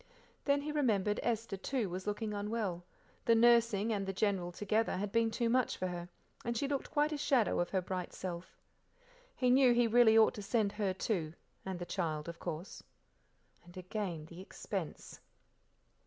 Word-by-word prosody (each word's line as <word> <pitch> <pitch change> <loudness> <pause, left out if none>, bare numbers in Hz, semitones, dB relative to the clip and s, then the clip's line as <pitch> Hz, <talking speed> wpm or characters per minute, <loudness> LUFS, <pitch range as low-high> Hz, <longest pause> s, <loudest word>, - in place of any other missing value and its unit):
Then 280 0 +3
he 300 - -3
remembered 215 -9 +1
Esther, 225 -3 -1
too, 235 +3 -1
was, 185 +2 -6
looking 210 +1 -2
unwell; 205 -4 -2 0.4
the 230 - +5
nursing 230 -2 +4
and 195 -2 -2
the - - 0
General 190 -3 0
together 210 +4 0
had 200 +1 -3
been 230 0 +2
too 235 +1 -1
much 250 +1 +1
for 185 - -2
her, 175 0 -6 0.3
and 235 0 -2
she 280 - 0
looked 275 -1 -2
quite 295 +1 +1
a 300 - -2
shadow 265 -7 +2
of 175 - 0
her 190 -2 0
bright 180 -1 -4
self. 180 -1 -7 0.8
He 250 -1 +2
knew 255 -2 +6
he 240 0 +4
really 230 -1 +6
ought 220 - +6
to 210 - -7
send 205 0 +1
her, 205 -2 -1
too, 180 -4 -2 0.3
and 190 -1 -3
the 175 - -5
child, 160 -5 -2
of 170 0 -7
course. 165 +4 -6 0.8
And 175 +1 -15
again 180 -4 -4
the 170 +3 -11
expense. 190 -3 -6
210 Hz, 180 wpm, -34 LUFS, 185-235 Hz, 0.8 s, knew